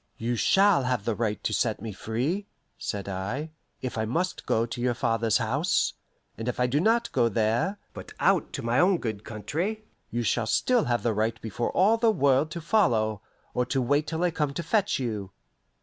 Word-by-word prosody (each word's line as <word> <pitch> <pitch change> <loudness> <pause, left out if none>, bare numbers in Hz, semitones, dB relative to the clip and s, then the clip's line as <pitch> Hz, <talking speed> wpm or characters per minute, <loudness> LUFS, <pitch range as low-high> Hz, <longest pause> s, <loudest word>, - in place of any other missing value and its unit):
"You 120 +2 -1
shall 195 - +4
have 125 -5 -1
the 115 - +1
right 105 -1 -2
to 110 - -1
set 110 +2 0
me 110 +1 -5
free," 130 - -2 0.3
said 100 -2 -4
I, 100 +12 -4 0.3
"if 125 -3 -3
I 110 - 0
must 170 +11 -2
go 115 +1 +2
to 115 +1 -6
your 125 -1 +1
father's 115 -2 +1
house. 140 - +1 0.5
And 115 - -4
if 125 - -2
I 125 - +3
do 130 +4 +1
not 230 +6 +2
go 120 -3 +2
there, 115 - +1 0.2
but - - -9
out - - +2
to - - -4
my 120 +3 +2
own 185 +1 +4
good 110 -7 -4
country, 165 - -3 0.3
you 120 +1 -2
shall 115 0 0
still 245 - +2
have 120 -1 0
the 115 - +1
right 110 +2 -1
before 115 +2 -3
all 210 +5 +4
the 230 0 +3
world 140 -6 +3
to 170 +2 -6
follow, 115 - +2 0.3
or 125 - +1
to 135 - 0
wait 145 +4 +1
till 160 +2 -2
I 175 - +2
come 150 -3 -1
to 170 - -3
fetch 205 +4 +1
you." 105 -7 -3
125 Hz, 205 wpm, -27 LUFS, 110-170 Hz, 0.5 s, shall